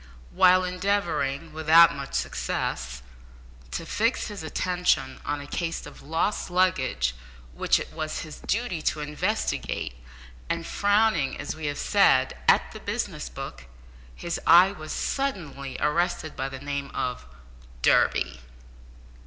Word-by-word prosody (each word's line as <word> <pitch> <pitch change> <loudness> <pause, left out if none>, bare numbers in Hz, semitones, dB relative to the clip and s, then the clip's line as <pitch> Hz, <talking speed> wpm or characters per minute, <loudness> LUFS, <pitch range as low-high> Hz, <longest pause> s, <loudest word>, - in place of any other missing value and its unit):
While 185 0 +5
endeavouring, 180 -6 -1
without 160 +2 +6
much 140 -1 -6
success, 60 -1 -2 0.7
to 165 - -4
fix 225 +9 0
his 205 -3 -7
attention 175 -4 0
on 145 0 -2
a 145 - -8
case 165 +3 -3
of - - -12
lost 165 +8 -1
luggage 140 - +1 0.4
which - - +2
it - - -8
was 155 -1 -3
his 155 -2 -9
duty 225 -7 -2
to 155 - -1
investigate, 150 - -2 0.6
and 170 0 -2
frowning 205 -8 +2
as 145 - -4
we 160 -1 -4
have 145 0 -2
said, - - +3
at - - +4
the - - -9
business - - -3
book, - - -8 0.5
his 170 -1 -4
eye 180 +3 +8
was 155 -6 -8
suddenly 165 - -3
arrested 160 +1 0
by 135 - -3
the 135 - -7
name 140 0 -4
of 125 - -3 0.6
"Durby." - - +3
160 Hz, 130 wpm, -26 LUFS, 140-185 Hz, 0.7 s, eye